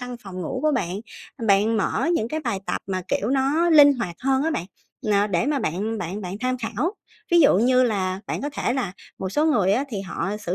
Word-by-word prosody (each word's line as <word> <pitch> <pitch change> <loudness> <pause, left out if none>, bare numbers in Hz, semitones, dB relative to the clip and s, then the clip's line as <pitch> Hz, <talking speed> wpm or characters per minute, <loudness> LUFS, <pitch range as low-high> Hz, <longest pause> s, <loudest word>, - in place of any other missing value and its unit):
căn 250 -1 -6
phòng 185 -1 -7
ngủ 255 +10 -3
của 305 -1 +3
bạn, 190 -4 -2 0.4
ừm, 225 - -4
bạn 210 +3 +3
mở 220 +9 0
những 230 -8 0
cái 310 +3 -3
bài 235 -8 -2
tập - - -2
mà, 185 -1 -2
kiểu, 210 - 0
nó 285 +6 +2
linh 290 -2 +8
hoạt 180 -9 -4
hơn 265 +1 +1
á 320 - 0
bạn, 180 - -3 0.4
ờ, 205 -1 +3
để 200 +5 0
mà 290 -2 +1
bạn 215 +3 -2
bạn 180 +5 -4
bạn 185 +2 -5
tham 255 0 0
khảo. 235 - -2 0.4
Ví 345 - +7
dụ 275 - +5
như 255 +2 +4
là 190 -5 0
bạn - - -3
có 290 - -2
thể 245 - -1
là, 245 -9 -2 0.3
một 190 - -3
số 300 +8 +1
người 205 -10 +3
á, 260 +6 +1
thì 210 -6 -4
họ 195 +2 -3
sử 185 -4 -3
225 Hz, 245 wpm, -23 LUFS, 195-270 Hz, 0.4 s, linh